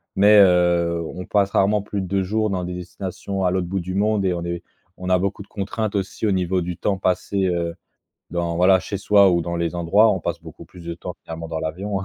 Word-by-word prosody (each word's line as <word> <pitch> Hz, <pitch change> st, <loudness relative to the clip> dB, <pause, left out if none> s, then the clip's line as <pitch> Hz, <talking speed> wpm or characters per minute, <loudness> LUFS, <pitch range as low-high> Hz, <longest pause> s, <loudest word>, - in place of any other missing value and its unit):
mais, 105 Hz, +2 st, +6 dB
heu, 85 Hz, -3 st, +4 dB
on 90 Hz, -, -7 dB
passe 100 Hz, -1 st, +1 dB
rarement 100 Hz, +2 st, +2 dB
plus 100 Hz, 0 st, -4 dB
de -, -, -4 dB
2 95 Hz, +1 st, 0 dB
jours 110 Hz, +3 st, 0 dB
dans 95 Hz, -2 st, -2 dB
des 90 Hz, 0 st, -4 dB
destinations 95 Hz, +2 st, -5 dB
à 90 Hz, -, +2 dB
l'autre 90 Hz, -1 st, -1 dB
bout 95 Hz, +2 st, -2 dB
du 90 Hz, +2 st, -5 dB
monde 105 Hz, +1 st, +1 dB
et 95 Hz, -2 st, +1 dB
on 85 Hz, -1 st, -4 dB
est 85 Hz, 0 st, -4 dB, 0.3 s
on 90 Hz, 0 st, -6 dB
a 90 Hz, -, +4 dB
beaucoup 100 Hz, +2 st, -2 dB
de -, -, -23 dB
contraintes 105 Hz, +1 st, -3 dB
aussi 95 Hz, +2 st, -2 dB
au 105 Hz, -, +2 dB
niveau 95 Hz, -1 st, 0 dB
du 90 Hz, 0 st, -4 dB
temps 100 Hz, -2 st, -1 dB
passé, 95 Hz, +1 st, 0 dB
heu, 85 Hz, -2 st, -1 dB, 0.6 s
dans 85 Hz, -1 st, -2 dB
voilà 95 Hz, +2 st, +5 dB
chez 100 Hz, -, -5 dB
soi 100 Hz, -1 st, +5 dB
ou 85 Hz, -1 st, +2 dB
dans 85 Hz, +1 st, -3 dB
les 85 Hz, 0 st, -2 dB
endroits. 95 Hz, +6 st, +4 dB
On 95 Hz, -, -2 dB
passe 85 Hz, 0 st, -4 dB
beaucoup 80 Hz, -2 st, -12 dB
plus 90 Hz, -2 st, -14 dB
de 85 Hz, -, -4 dB
temps 90 Hz, +1 st, -7 dB
clairement 80 Hz, 0 st, -7 dB
dans 80 Hz, -1 st, -3 dB
l'avion, 95 Hz, +6 st, -3 dB
hein. -, -, -5 dB
95 Hz, 250 wpm, -22 LUFS, 85-100 Hz, 0.6 s, mais